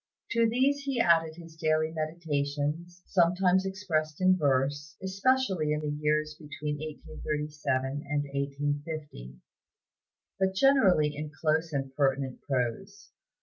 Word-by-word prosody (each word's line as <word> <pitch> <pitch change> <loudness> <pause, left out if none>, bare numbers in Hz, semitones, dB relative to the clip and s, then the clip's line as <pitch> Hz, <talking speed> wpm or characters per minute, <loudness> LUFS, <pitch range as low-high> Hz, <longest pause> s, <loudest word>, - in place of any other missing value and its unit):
To 230 -1 +3
these 265 +5 +2
he 275 -3 -2
added 165 -5 +3
his 165 -1 -12
daily 155 -1 +1
meditations, 155 +1 -3
sometimes 180 +1 +3
expressed 160 -6 -2
in 185 0 +5
verse, 145 0 0
especially 190 -5 +1
in 150 - -1
the 150 -1 -2
years 150 0 +1
between 150 0 -5
1837 150 -2 -3 0.2
and 145 0 +1
1850, 145 - -4 1.0
but 190 0 +1
generally 190 - +4
in 150 +1 -5
close 160 +1 +1
and 135 -2 -3
pertinent 135 -2 0
prose. 135 - -3
155 Hz, 115 wpm, -29 LUFS, 145-185 Hz, 1.0 s, in